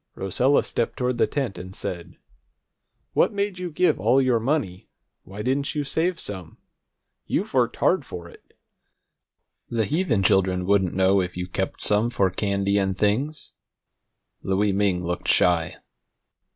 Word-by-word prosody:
Rosella 125 +9 +2
stepped 115 - -2
toward 125 -1 -1
the - - +4
tent, 135 -9 -3
and 95 +1 -9
said: 90 -4 -6 1.0
"What - - +3
made 200 -2 -2
you 180 -1 -4
give 180 +3 +1
all 130 - +3
your 130 -3 +2
money? 110 - -2 0.4
Why 100 +2 -7
didn't 140 +5 -1
you 150 - 0
save 165 +5 -1
some? 95 -5 -6 0.7
You've - - -2
worked - - +2
hard - - +2
for 85 -1 -8
it. - - -18 1.1
The 115 -2 0
heathen 145 - 0
children 95 -1 +2
wouldn't 95 -2 +2
know 95 +1 +3
if 90 -1 -5
you 90 - -2
kept 95 +1 -3
some 105 +3 +3
for 100 -6 +1
candy 100 +1 0
and 95 -1 -1
things." 130 +10 -1 0.9
Louie 100 +2 +1
Ming 95 -3 0
looked 90 +1 -3
shy. 85 -2 +3
100 Hz, 150 wpm, -24 LUFS, 95-130 Hz, 1.1 s, the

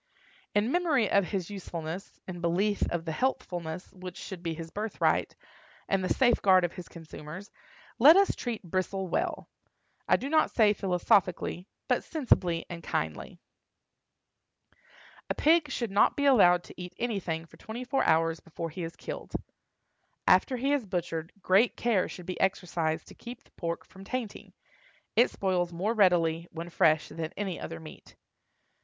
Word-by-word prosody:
In 210 +4 +2
memory 310 - +2
of 200 -1 +4
his 190 0 -3
usefulness, 175 -2 -6
in 175 -2 -6
belief 195 +5 +1
of 175 -1 -2
the 160 - -2
healthfulness 175 -6 -3
which 185 -1 -9
should 190 -4 -7
be 165 -2 -3
his 165 0 -8
birthright, 215 +1 0 0.5
and 195 -1 +1
the 185 - -1
safeguard 195 -8 +4
of 175 - -4
his 180 -2 -9
consumers, 165 +3 -10 0.5
let 300 +9 +9
us 395 0 +4
treat 235 -4 -4
Bristle 185 +2 -2
well—I - - -3
do 265 - -3
not 310 +2 +3
say 215 -3 +4
philosophically, 180 -1 +1 0.2
but - - +1
sensibly 185 - +1
and 170 -1 -7
kindly. - - -3 1.9
A - - 0
pig 315 -1 +4
should 235 -5 -3
not 200 - +4
be 285 - 0
allowed 180 -10 +6
to - - -11
eat 180 0 -8
anything 185 -9 -2
for - - -18
twenty 225 +3 -7
four 270 +2 0
hours 165 +1 +2
before 165 0 -6
he 180 +3 -6
is 165 0 -5
killed. - - -7 0.9
After 255 - +4
he 270 +4 0
is 285 -4 +1
butchered, 165 -2 -3
great 200 +6 +4
care 225 -6 +1
should 180 - -9
be 185 0 -4
exercised 165 -4 0
to - - -12
keep 240 0 -10
the - - -27
pork 170 -1 -4
from 190 - -14
tainting; 230 0 -5 0.6
it 240 - +5
spoils 180 -3 -1
more 190 +6 -1
readily, 170 -5 +3
when 170 +1 -7
fresh, 155 -1 +3
than 160 0 -5
any 195 -3 -3
other 165 0 -6
meat. 155 -1 -13
185 Hz, 160 wpm, -29 LUFS, 170-220 Hz, 1.9 s, let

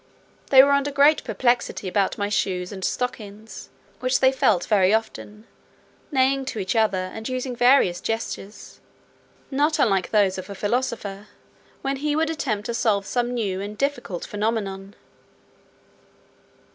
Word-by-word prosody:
They 265 -1 +9
were 280 - +3
under 280 0 +2
great 285 +2 +4
perplexity 240 -2 0
about 195 +1 0
my 205 - -1
shoes 180 -3 -1
and 190 -2 -8
stockings, 215 -2 -5 0.3
which 255 0 +1
they 260 0 +5
felt 220 -8 +2
very 195 -3 +3
often, 215 -1 -5 0.7
neighing 270 0 +2
to 260 - -5
each 195 +2 -2
other, 195 -4 +1
and 220 +3 -6
using 255 0 -3
various 245 -8 +4
gestures, 225 -2 -5 0.7
not 295 +3 +1
unlike 195 -10 +2
those 195 -3 +2
of 185 - -9
a 200 - -6
philosopher, 205 -2 -3 0.6
when 275 0 -1
he 295 +2 -1
would 320 +1 +1
attempt 220 -10 -3
to 235 - -3
solve 215 -4 +1
some 245 +2 -1
new 195 -5 -2
and 205 +1 -6
difficult 275 -11 -3
phenomenon. 205 -2 -3
220 Hz, 145 wpm, -23 LUFS, 200-260 Hz, 0.7 s, They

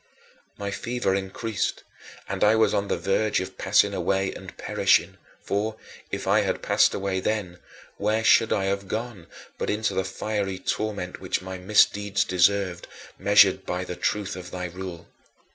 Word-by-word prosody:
My 100 0 -4
fever 120 -1 -1
increased, 95 +2 -2 0.4
and - - -2
I 105 +1 +5
was 110 0 +3
on 100 0 0
the - - 0
verge 105 +2 +1
of 95 0 -7
passing 100 +1 +3
away 95 +1 0
and - - -11
perishing; - - +2 0.3
for, 105 +2 -1 0.3
if - - -4
I - - +4
had - - -2
passed - - +3
away 95 -1 -1
then, 95 -4 -2 0.4
where 110 +2 0
should 115 0 +5
I 95 - +1
have 100 0 -2
gone 110 -4 -5 0.3
but - - -2
into 105 +1 0
the 95 - 0
fiery 95 0 -3
torment 100 -2 -3
which - - -2
my 95 0 -6
misdeeds 100 +1 +3
deserved, 90 0 +1 0.3
measured 100 0 +5
by 90 +1 -3
the 90 -1 -6
truth 100 +1 -1
of 90 -1 -8
thy 90 0 -5
rule? 90 -1 -7
100 Hz, 160 wpm, -25 LUFS, 95-105 Hz, 0.4 s, I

